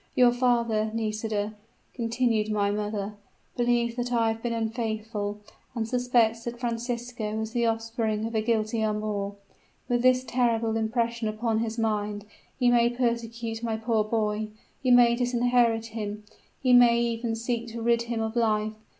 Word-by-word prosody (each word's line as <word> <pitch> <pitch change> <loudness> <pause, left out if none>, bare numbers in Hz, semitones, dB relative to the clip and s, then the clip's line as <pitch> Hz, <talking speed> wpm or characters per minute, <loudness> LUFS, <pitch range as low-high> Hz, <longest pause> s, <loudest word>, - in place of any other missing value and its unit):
Your 245 -1 +6
father, 235 -3 +1
Nisida,' 215 -1 -2 0.4
continued 230 -2 0
my 205 -1 +1
mother, 210 0 -3 0.4
'believes 240 -1 +1
that 245 0 -2
I 230 -2 +2
have 225 0 -6
been 240 - -2
unfaithful, 220 -2 -2 0.4
and 225 -2 -1
suspects 235 -2 +2
that 235 0 -5
Francisco 235 -2 -3
is 220 0 -3
the 235 0 +1
offspring 225 -1 -1
of 230 - -4
a 220 - +1
guilty 220 0 0
amour. 210 -2 -2 0.5
With 240 -1 +1
this 255 0 +4
terrible 230 -3 +1
impression 230 +1 0
upon 220 +1 0
his 225 0 -2
mind, 210 -2 -1 0.3
he 245 -2 +4
may 235 0 +4
persecute 235 -2 -2
my 225 -2 -1
poor 220 -1 +1
boy; 215 -1 -1 0.3
he 260 - 0
may 240 -1 +6
disinherit 240 -2 +2
him; 210 -1 -4 0.4
he 255 -1 +4
may 240 -1 +7
even 230 -1 -1
seek 235 +1 -2
to 230 0 -6
rid 235 0 +3
him 235 -1 -3
of 220 +1 -3
life. 215 -2 +1
230 Hz, 155 wpm, -27 LUFS, 220-240 Hz, 0.5 s, may